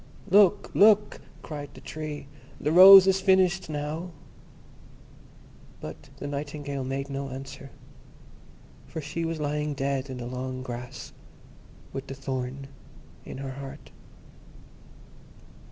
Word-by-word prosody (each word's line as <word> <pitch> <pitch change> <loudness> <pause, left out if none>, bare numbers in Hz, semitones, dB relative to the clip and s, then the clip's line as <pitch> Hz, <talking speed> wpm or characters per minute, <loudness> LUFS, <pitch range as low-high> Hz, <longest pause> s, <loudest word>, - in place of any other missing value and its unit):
"Look, 205 0 +5
look!" 210 0 +4 0.2
cried 145 -2 -8
the - - -11
Tree, 155 -2 -6 0.3
"the 150 - -1
rose 190 +2 +11
is 190 0 +2
finished 190 -2 +3
now"; 155 +4 -4 1.7
but 80 - -9
the 145 - -7
Nightingale 145 -1 -4
made 135 +1 -3
no 140 0 -5
answer, 135 +1 -9 1.2
for 160 - -6
she 160 +3 -4
was 165 -1 -3
lying 150 0 -2
dead 135 0 -2
in 130 - -6
the 120 - -6
long 130 +1 -5
grass, 125 -1 -8 0.8
with 135 0 -6
the 135 - -6
thorn 130 0 -4 0.6
in - - -8
her 135 0 -5
heart. 140 +2 -10
145 Hz, 120 wpm, -27 LUFS, 135-165 Hz, 1.7 s, rose